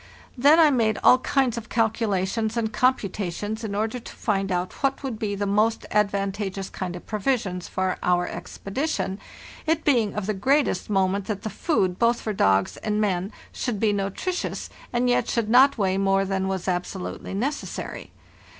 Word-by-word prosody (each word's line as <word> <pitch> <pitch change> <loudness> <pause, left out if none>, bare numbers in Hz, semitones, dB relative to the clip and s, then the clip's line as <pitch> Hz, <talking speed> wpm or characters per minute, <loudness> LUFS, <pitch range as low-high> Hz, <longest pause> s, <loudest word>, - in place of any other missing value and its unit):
Then 285 +6 +6
I 310 -3 +7
made 225 -5 +2
all 255 - +7
kinds 255 -3 +1
of 225 - -13
calculations 220 -1 0
and 220 -1 -1
computa 205 -7 +1
tions 210 +5 -4
in 205 -2 -3
order 220 +4 -1
to - - -10
find 195 -3 -1
out 180 0 -2
what 275 0 0
would 250 -5 -4
be 210 -3 -2
the 205 +1 -2
most 210 +3 +1
advan 200 -1 +1
tageous 195 -1 -5
kind 180 -2 -4
of 175 - -9
provisions 210 -5 -1
for 185 -1 -1
our 180 0 +2
expedition, 200 -3 -3 0.5
where 320 +1 +3
it 315 - -23
was 230 -8 +2
of 210 - -1
the 215 - 0
greatest 265 0 +1
moment 195 0 +1
that 205 -2 -4
the 220 - -3
food 190 - 0
both 235 0 +3
for 215 - -3
dogs 95 - +2
and 210 -1 -1
men 195 -1 0 0.2
should 235 -5 -3
be 215 -1 +2
nutritious, 200 - -3 0.2
and 240 +1 +1
yet 245 - +2
should 225 -2 0
not 265 +3 +6
weigh 190 -2 +1
more 195 0 +2
than 190 0 -1
was 190 -1 -3
absolutely 180 +1 -3
necessary. 265 +9 -4
210 Hz, 180 wpm, -25 LUFS, 195-240 Hz, 0.5 s, I